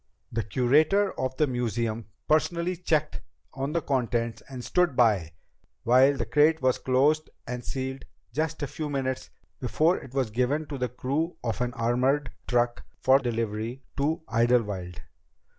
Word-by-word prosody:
"The 115 - -1
curator 150 - +3
of 130 0 -2
the 155 - +4
museum 115 -3 -2 0.2
personally 170 +3 +1
checked 155 -3 0 0.3
on 135 +2 -3
the 170 -2 0
contents 120 -4 -1
and 125 -2 -7
stood 180 -6 +2
by 100 -10 +3 0.5
while 130 +4 +5
the 115 - -1
crate 150 +7 +4
was 130 -1 +2
closed 145 +4 +2 0.2
and 125 0 -5
sealed 130 +1 -4 0.3
just 160 0 -2
a - - -1
few 150 +2 -5
minutes 130 -2 -2 0.3
before 155 +8 +2
it 130 0 -12
was 130 -5 0
given 130 +7 0
to 140 -3 -5
the 125 -1 -1
crew 140 +7 -2
of 115 0 -2
an 125 0 0
armored 125 +4 +1 0.2
truck 120 -1 +1 0.2
for 130 +1 +5
delivery 115 0 -3
to 155 +3 0
Idlewild." 110 -6 +1
130 Hz, 150 wpm, -27 LUFS, 120-150 Hz, 0.5 s, while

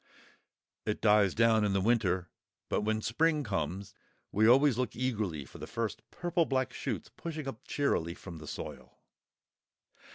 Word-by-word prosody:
It 105 - -2
dies 105 -3 +4
down 115 -1 +4
in 105 -2 +1
the 95 - +2
winter, 95 -4 +2 0.4
but - - +1
when 110 +1 0
spring 155 +6 +2
comes 100 -3 -3 0.4
we 110 +2 +4
always 135 +2 +6
look 125 -1 -2
eagerly 105 - -2
for - - -13
the - - -6
first 115 -2 -3
purple 175 -1 0
black 130 -2 0
shoots - - -4
pushing 155 -4 -5
up 115 -5 -7
cheerily 85 - 0
from 85 -4 -9
the 75 -1 -10
soil. - - -7
110 Hz, 155 wpm, -31 LUFS, 100-130 Hz, 0.4 s, always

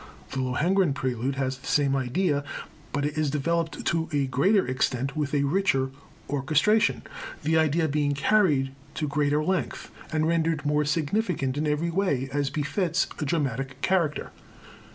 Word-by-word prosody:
The 135 - -3
Lohengrin 155 +6 +2
Prelude 130 0 -2
has 130 -1 -2
the - - -11
same 140 -2 +2
idea, 140 +3 0 0.5
but 145 0 -1
it 150 +1 -2
is 155 -2 +1
developed 165 +2 -1
to 165 -1 0
a 145 -2 +1
greater 185 - +3
extent, 130 +1 -1
with 150 -3 -1
a 140 - +2
richer 140 -4 +1 0.4
orchestration, 150 +10 +2 0.4
the 160 +1 +3
idea 160 +1 +2
being 145 -1 0
carried 145 -5 +3 0.2
to 155 - -1
greater 145 +1 +1
length, 185 +2 -2 0.2
and 155 0 +1
rendered 165 -2 +1
more 150 +1 +2
significant 150 - 0
in 150 +1 -1
every 150 +3 0
way, 155 -8 0
as 145 -1 0
befits 165 +5 0
its 150 - -6
dramatic 135 -3 -2
character. 170 -6 +1
150 Hz, 155 wpm, -26 LUFS, 135-165 Hz, 0.5 s, greater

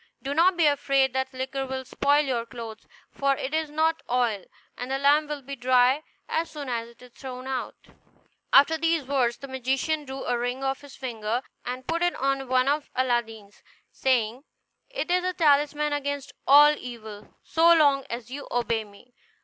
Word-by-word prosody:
Do 275 +1 -2
not 345 +4 +4
be 335 - +4
afraid 275 -2 +2
that 265 0 -1
the 260 - -13
liquor 265 +1 -3
will 260 0 -4
spoil 285 +3 +2
your 245 -4 -1
clothes, 230 -3 -9 0.2
for 275 0 +1
it 265 +3 -4
is 315 -1 0
not 320 +2 +1
oil, 235 -6 0 0.3
and 245 +1 -6
the 270 - 0
lamp 290 +2 +3
will 295 -2 -5
be 275 +2 -6
dry 255 +2 +3 0.3
as 330 +1 -1
soon 290 -3 -7
as 230 -1 -2
it 235 +1 -18
is 250 - -15
thrown 255 0 -8
out." 265 -1 -4 0.8
After 315 +4 +6
these 330 -1 +1
words 250 -3 +1
the 275 - -9
magician 265 +4 -1
drew 265 0 -6
a 245 - 0
ring 245 +2 -3
off 270 0 -1
his 285 -2 -13
finger, 235 -1 -3 0.2
and 255 +1 -5
put 335 +3 -1
it 350 0 +1
on 275 0 -1
one 255 +1 +2
of 290 +1 0
Aladdin's, 230 -5 -2 0.3
saying: 250 -1 0 0.5
"It - - -3
is 360 0 +2
a 365 0 -1
talisman 295 -2 +2
against 285 -1 -3 0.2
all 295 +2 +8
evil, 220 -4 -10
so 330 +1 +4
long 285 -4 +5
as 235 +1 -6
you 285 +2 -7
obey 230 -2 0
me. 210 +4 -18
265 Hz, 190 wpm, -26 LUFS, 245-290 Hz, 0.8 s, all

